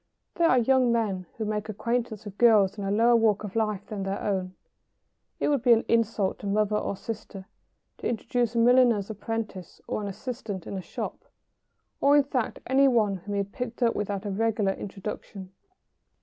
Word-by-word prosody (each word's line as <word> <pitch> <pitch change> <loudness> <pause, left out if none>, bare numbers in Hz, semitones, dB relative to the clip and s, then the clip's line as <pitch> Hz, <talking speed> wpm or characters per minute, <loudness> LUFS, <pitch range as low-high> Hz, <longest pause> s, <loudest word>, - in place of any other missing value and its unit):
There 335 -1 +3
are 255 - +5
young 250 0 +3
men 200 -6 -1
who 220 - -2
make 210 0 -3
acquaintance 225 0 -2
with 205 -1 -9
girls 215 -5 +5
in 205 - -6
a - - -1
lower 230 +4 +4
walk 220 -3 +3
of 205 -1 -7
life 215 -3 -1
than 210 -2 -5
their 195 +1 -2
own. 185 -2 -2 0.8
It - - +1
would 285 -4 +2
be 245 -1 +6
an 225 - +2
insult 225 -4 +1
to 205 - -6
mother 210 +1 +1
or 205 - -1
sister 205 -3 -7 0.5
to - - -2
introduce 240 0 -1
a - - 0
milliner's 235 -3 +4
apprentice 210 -4 -5
or - - -3
an 205 - -4
assistant 210 -2 -6
in - - -6
a 190 - -3
shop, - - -6 0.7
or, 285 +1 +5
in 290 - +5
fact, 260 -4 -2
any 270 +2 +4
one 215 -6 +2
whom 205 +3 -6
he 200 - +1
had 200 - -14
picked 245 -1 -4
up 230 - +3
without 205 -1 -3
a 205 - -2
regular 210 -1 +1
introduction. 195 -1 -7
215 Hz, 190 wpm, -27 LUFS, 200-235 Hz, 0.8 s, be